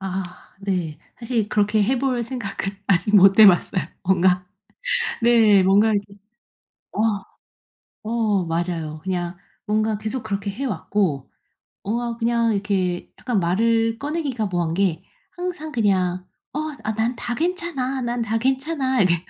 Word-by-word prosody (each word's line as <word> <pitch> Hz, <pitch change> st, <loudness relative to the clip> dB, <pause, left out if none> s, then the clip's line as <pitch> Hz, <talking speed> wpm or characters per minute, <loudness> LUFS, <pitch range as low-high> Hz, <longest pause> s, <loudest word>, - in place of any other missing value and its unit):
아. 185 Hz, -1 st, -5 dB, 0.2 s
네. 180 Hz, -6 st, -2 dB, 0.2 s
사실 230 Hz, -3 st, -1 dB
그렇게 210 Hz, 0 st, +2 dB
해 250 Hz, +5 st, +1 dB
볼 255 Hz, -2 st, 0 dB
생각은 225 Hz, -5 st, -4 dB
아직 200 Hz, +2 st, +2 dB
못 195 Hz, 0 st, +7 dB
해 215 Hz, -, +11 dB
봤어요. 185 Hz, -1 st, +3 dB, 0.2 s
뭔가 180 Hz, 0 st, +3 dB, 0.8 s
네. 225 Hz, -4 st, +5 dB
뭔가 205 Hz, +4 st, +4 dB
이렇게 205 Hz, -1 st, -2 dB, 0.8 s
어 210 Hz, -2 st, 0 dB, 0.8 s
어 215 Hz, -4 st, +1 dB
맞아요. 165 Hz, -2 st, -2 dB
그냥 175 Hz, -2 st, -2 dB, 0.3 s
뭔가 215 Hz, 0 st, +1 dB
계속 220 Hz, +3 st, -4 dB
그렇게 200 Hz, -1 st, -3 dB
해 235 Hz, +8 st, -5 dB
왔고 185 Hz, -, -1 dB, 0.5 s
어 235 Hz, +3 st, -2 dB
그냥 230 Hz, -1 st, +1 dB
이렇게 190 Hz, -3 st, -1 dB
약간 230 Hz, -7 st, 0 dB
말을 225 Hz, +5 st, +1 dB
꺼내기가 285 Hz, -6 st, -2 dB
뭐한 175 Hz, -4 st, -1 dB
게 185 Hz, -3 st, 0 dB, 0.3 s
항상 350 Hz, -4 st, -5 dB
그냥 185 Hz, -5 st, +1 dB, 0.3 s
"어 300 Hz, -, -2 dB, 0.3 s
난 225 Hz, +3 st, 0 dB
다 240 Hz, 0 st, -3 dB
괜찮아. 325 Hz, -6 st, -2 dB
난 240 Hz, 0 st, -2 dB
다 225 Hz, 0 st, 0 dB
괜찮아." 265 Hz, +1 st, 0 dB
이렇게 180 Hz, -2 st, +4 dB
210 Hz, 245 characters per minute, -22 LUFS, 190-240 Hz, 0.8 s, 해